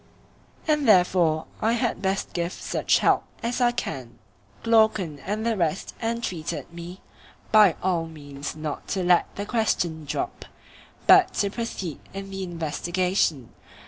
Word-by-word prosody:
And 300 -3 +2
therefore 175 -5 +4 0.2
I 225 +2 +2
had 240 0 -1
best 195 0 -1
give 170 0 -2
such - - +1
help - - +3 0.2
as 240 +2 -1
I 240 -1 +4
can. 125 - -5 0.5
Glaucon 220 -9 +3
and 210 +9 -3
the 230 -1 +1
rest 170 -2 -1
entreated 225 -9 -3
me 175 +2 -9 0.5
by 210 -6 +7
all 175 -3 +1
means 145 -3 -7
not 155 -1 -5
to 190 -2 -1
let 175 0 +4
the 205 - -4
question 180 -9 0
drop, 360 - -4 0.6
but 370 -1 +6
to 200 -1 +1
proceed 200 - -4 0.2
in 195 0 -6
the 195 0 -5
investigation. 170 - -1
185 Hz, 140 wpm, -25 LUFS, 165-220 Hz, 0.6 s, by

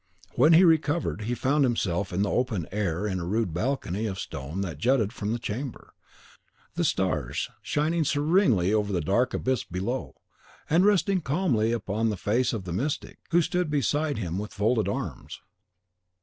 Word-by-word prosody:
When 150 +7 +5
he 170 +3 +7
recovered, 145 - +2
he 120 +2 -1
found 140 +4 +2
himself 100 -7 0
in 95 +3 0
the 105 - -1
open 115 - -1
air 100 -2 -1
in 95 -3 -1
a - - -4
rude 95 0 -1
balcony 110 0 -1
of 95 -2 -4
stone 75 +2 -5
that 85 -7 -4
jutted 115 - +2
from 105 -3 -3
the 115 - 0
chamber, 120 +2 -6 0.8
the - - -1
stars - - -1
shining 160 +3 0
serenely 145 - +2
over 105 -1 +1
the 90 -3 0
dark 115 +11 +1
abyss 130 -2 0
below, 100 +9 -4 0.5
and 170 +5 +4
resting 200 -2 +2
calmly 135 - +1
upon 110 0 -1
the 105 - -2
face 115 +7 +1
of 110 -5 -4
the 90 -2 -5
mystic, 135 - -3
who 170 +1 +4
stood 180 0 -1
beside 145 0 0
him 90 -3 -3
with 105 +1 -6
folded 110 +2 +1
arms. - - -5
115 Hz, 170 wpm, -27 LUFS, 100-145 Hz, 0.8 s, he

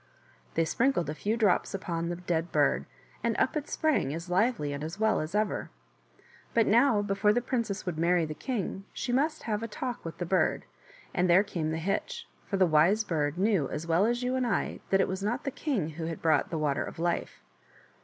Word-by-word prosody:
They 165 - +3
sprinkled 230 - +1
a - - -3
few 210 +8 -1
drops 205 -3 +2
upon 170 -3 -3
the 175 - -2
dead 175 -1 -2
bird, - - +2 0.4
and - - 0
up - - +1
it 300 -1 -3
sprang 285 - +1
as 170 +2 -7
lively 185 - +1
and 140 +1 -5
as 160 +6 -6
well 220 0 +3
as 155 +5 -5
ever. 215 0 0 0.9
But 230 -1 +5
now, 225 -1 +4
before 205 +1 +2
the 240 - +2
princess 230 -5 -2
would 175 -4 -3
marry 170 0 +3
the 155 - -5
king 195 - -4
she 245 - -3
must 305 +5 +1
have 210 -2 -1
a 230 - -3
talk 240 +3 -5
with 165 -2 -7
the 175 - -3
bird, 185 +2 +1 0.5
and 180 -1 +1
there 180 +3 +6
came 170 -6 -3
the 160 - -1
hitch, 190 +5 -2 0.2
for 195 - -1
the 190 - +5
Wise 170 +7 +4
Bird 150 -4 -1
knew 190 -7 +2
as 155 - -4
well 170 +5 +3
as 240 +1 0
you 250 +1 0
and 255 -1 0
I 225 - -1
that 195 0 +4
it - - +2
was 190 +1 -3
not 235 +6 -1
the 275 - -2
king 250 - -1
who 160 +1 -6
had 165 0 -4
brought 160 -1 +2
the 165 - -2
Water 150 -2 0
of - - -8
Life. 170 +1 -2
190 Hz, 220 wpm, -29 LUFS, 165-225 Hz, 0.9 s, there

